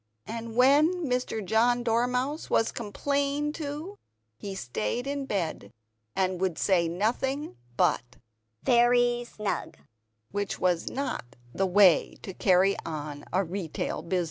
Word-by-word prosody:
And 230 0 -6
when 300 +8 +4
Mr. 250 -5 -1
John 240 +5 +3
Dormouse 250 +6 0
was 225 - +2
complained 280 +6 -1
to, 310 +6 -6 0.4
he 195 - -7
stayed 125 - -3
in 280 -1 -3
bed, 165 - -3 0.4
and 185 -1 0
would 185 -4 0
say 175 -4 +2
nothing 235 - -1 0.2
but 120 +1 +1 0.5
"very 240 0 +4
snug;" 210 - -4 0.5
which 205 0 -2
is 180 -2 +1
not 135 - -4 0.2
the 195 - +1
way 185 -2 +5
to 190 - -6
carry 190 +1 +3
on 150 -2 -6
a 190 +3 +2
retail 175 -2 -4
business. 180 +2 -1
220 Hz, 125 wpm, -28 LUFS, 185-255 Hz, 0.5 s, way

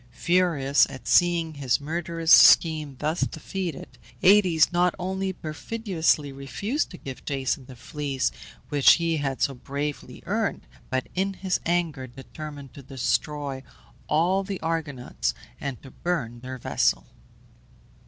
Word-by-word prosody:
Furious 150 -1 +2
at 135 -1 -10
seeing 170 -2 +3
his 135 -4 0
murderous 165 +2 -2
schemes 155 -4 +6
thus 155 +5 -2
defeated, 160 -6 -4 0.2
Aëtes 180 -5 +5
not 175 0 +2
only 190 +1 -2
perfidiously 165 -3 -1
refused 140 - -3
to 180 - -10
give 135 -5 -9
Jason 135 -1 -2
the 130 - -11
Fleece 135 - -2 0.4
which 145 -2 +6
he 165 -1 0
had 135 -3 -2
so 140 - +1
bravely 140 0 -5
earned, 215 +2 -1 0.2
but, 130 -1 -1
in 195 +1 -1
his 185 -1 -1
anger, 165 -6 -1
determined 140 +2 -10
to 140 - -10
destroy 135 +1 -2 0.5
all 175 +6 +2
the 195 -1 -5
Argonauts, 145 - -2 0.2
and 135 -4 -5
to 135 - -12
burn 125 -10 -3
their 130 +1 -7
vessel. - - 0
150 Hz, 130 wpm, -25 LUFS, 135-175 Hz, 0.5 s, schemes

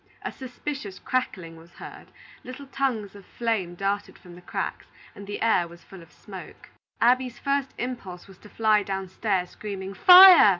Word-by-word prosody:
A - - -4
suspicious 255 -5 -7
crackling 185 -10 -3
was 165 +1 -17
heard, - - -11 0.4
little 255 +2 -9
tongues 260 -7 -2
of 200 -1 -13
flame 210 -6 -3
darted 200 +2 -3
from 180 - -15
the 175 - -13
cracks, - - -5 0.3
and 200 - -11
the 205 - -4
air 185 -6 +2
was 170 +1 -15
full 190 -2 -13
of 165 - -17
smoke. - - -12 0.3
Abby's 250 +1 +2
first 275 -1 -2
impulse 200 -8 -6
was 190 -2 -16
to 210 - -15
fly 215 -1 +2
downstairs, 190 -1 -3
screaming 195 -2 -7
"Fire!" 365 - +9
205 Hz, 165 wpm, -25 LUFS, 185-255 Hz, 0.4 s, Fire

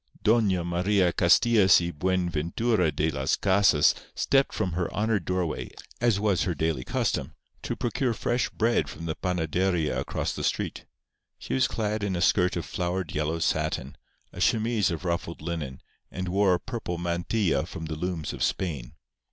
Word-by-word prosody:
Doña 105 -6 +3
Maria 90 +1 +2
Castillas 110 -6 +5
y 85 0 -2
Buenventura 90 +4 0
de 80 +2 0
las 70 +2 0
Casas 95 -6 +4 0.2
stepped 135 0 +2
from 90 - -2
her 90 +1 -2
honoured 105 -3 0
doorway, 90 -3 -2 0.3
as 120 -5 +3
was 100 -3 +1
her 85 - 0
daily 80 -4 -1
custom, - - -2 0.3
to - - -3
procure 120 0 -1
fresh 120 +3 0
bread 115 -10 +1
from 80 +2 -8
the 80 - -1
panaderia 90 -1 0
across - - -2
the - - -5
street. - - -2 0.5
She - - -6
was 130 -2 +3
clad 110 -1 -2
in 100 -2 -1
a 85 - -2
skirt 90 -1 +3
of 85 -3 -3
flowered 90 +1 -3
yellow 80 +2 -1
satin, 70 -3 -1 0.4
a - - -7
chemise 110 -2 +2
of 85 0 -4
ruffled 85 -1 -2
linen, 75 -5 -5 0.3
and 90 0 -4
wore 95 0 +3
a - - -3
purple 110 -7 -5
mantilla 85 +2 0
from 80 - -7
the 80 0 -4
looms 85 -1 -3
of - - -8
Spain. 75 -10 -2
90 Hz, 165 wpm, -27 LUFS, 80-105 Hz, 0.5 s, Castillas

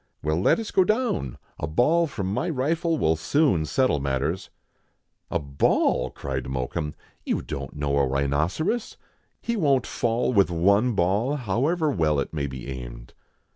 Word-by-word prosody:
" - - -47
Well, 75 +3 0
let - - +4
us 225 -2 -5
go 190 - +4
down, 215 - -1 0.2
a 75 - -2
ball 155 - +3
from 100 -9 -3
my 175 - -1
rifle 160 +3 0
will 80 - +2
soon 90 - +2
settle 130 - +2
matters." 70 +6 -2 0.8
"A - - +1
ball!" 70 -1 +1
cried 65 -2 -5
Mokoum; 65 +3 -3 0.3
"you - - -1
don't 70 -2 -6
know 75 -1 -1
a 70 - +3
rhino 70 +3 +1
eros. 225 +8 -1 0.5
He 235 - -1
won't 140 - +2
fall 120 +2 0
with 100 -4 +4
one 100 +8 +3
ball, 100 +9 +1
however 145 - 0
well 80 - +1
it 70 - -3
may 70 -3 -1
be 65 -1 -7
aimed." - - -8
95 Hz, 165 wpm, -25 LUFS, -, 0.8 s, let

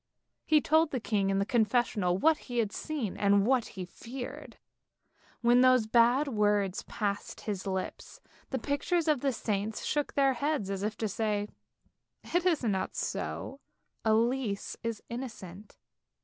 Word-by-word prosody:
He 310 -1 +5
told 315 +2 +3
the 260 - -2
king 200 -3 0
in 195 - +1
the 195 - +1
confessional 220 -5 +1
what 315 +8 +3
he 245 - -3
had 220 -3 +1
seen 280 -9 -3
and 200 0 +3
what 255 -1 +3
he 185 - -3
feared. 245 +8 -8 0.8
When 240 +1 +5
those 255 -3 +5
bad 240 +6 +4
words 205 -5 +1
passed 205 -1 -3
his 200 -3 -4
lips, 190 -1 -4 0.3
the - - -1
pictures 320 +4 0
of 300 -5 +2
the 275 - +2
saints 210 -2 -2
shook 295 -1 -1
their 275 -1 +4
heads 260 -6 -1
as 195 -1 -3
if 210 +1 -2
to 220 - -1
say: 210 0 -1 0.8
it 350 +1 +2
is 325 -7 +2
not 200 -5 -1
so, 275 - -4 0.4
Elise 225 -1 +1
is 230 -2 -4
innocent. 215 -6 -8
230 Hz, 150 wpm, -30 LUFS, 205-265 Hz, 0.8 s, He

